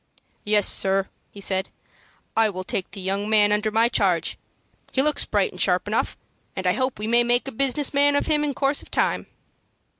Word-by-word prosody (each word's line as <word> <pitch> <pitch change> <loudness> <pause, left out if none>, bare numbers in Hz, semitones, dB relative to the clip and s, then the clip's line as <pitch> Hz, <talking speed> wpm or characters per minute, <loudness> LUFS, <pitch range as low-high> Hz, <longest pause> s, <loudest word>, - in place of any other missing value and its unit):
"Yes, 210 -1 +2
sir," 195 0 0 0.2
he 200 - -13
said, 190 -1 -1 0.7
"I 225 -1 +4
will 185 -2 -5
take 185 0 -3
the - - -9
young 195 +2 -2
man 210 -1 +4
under 210 +1 +1
my 225 +2 +3
charge; 185 -8 +1 0.6
he 265 - +2
looks 300 0 +1
bright - - 0
and - - -7
sharp - - +1
enough, - - -1 0.4
and 190 - -5
I 180 - +3
hope 255 0 -1
we 210 - -5
may 235 +2 +3
make 240 +2 +1
a - - -3
business 275 +4 +1
man 285 0 +4
of 285 - +1
him 300 -2 +2
in 285 -2 -2
course 275 +1 0
of - - -15
time." - - 0
220 Hz, 205 wpm, -23 LUFS, 195-270 Hz, 0.7 s, I